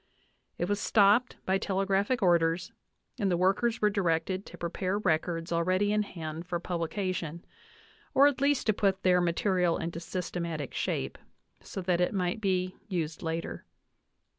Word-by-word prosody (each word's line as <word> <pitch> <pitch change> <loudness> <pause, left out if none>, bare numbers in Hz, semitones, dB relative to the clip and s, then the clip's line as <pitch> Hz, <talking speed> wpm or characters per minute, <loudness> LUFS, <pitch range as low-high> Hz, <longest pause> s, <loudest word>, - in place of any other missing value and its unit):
It 175 - -1
was 205 +1 0
stopped 210 +5 +4
by 190 +1 +2
telegraphic 195 +4 0
orders, 170 -1 +2 0.5
and 200 -3 +1
the 175 - +2
workers 195 +6 +1
were 210 - +6
directed 185 0 0
to - - -11
prepare 185 +3 -2
records 165 -2 0
already 185 +5 +2
in 210 - +3
hand 165 -4 -6
for 175 -1 -2
publication, 175 -1 -3 0.7
or 275 - +7
at 285 -2 +2
least 280 -1 +2
to 215 - +3
put 195 -1 0
their 180 -1 +4
material 175 0 +1
into 165 0 -4
systematic 170 -4 -4
shape, 65 - -2 0.4
so 190 - -6
that 175 -1 +1
it 180 - +1
might 180 +3 -1
be 185 -2 0
used 165 -5 -3
later. 165 0 -4
185 Hz, 150 wpm, -29 LUFS, 170-200 Hz, 0.7 s, or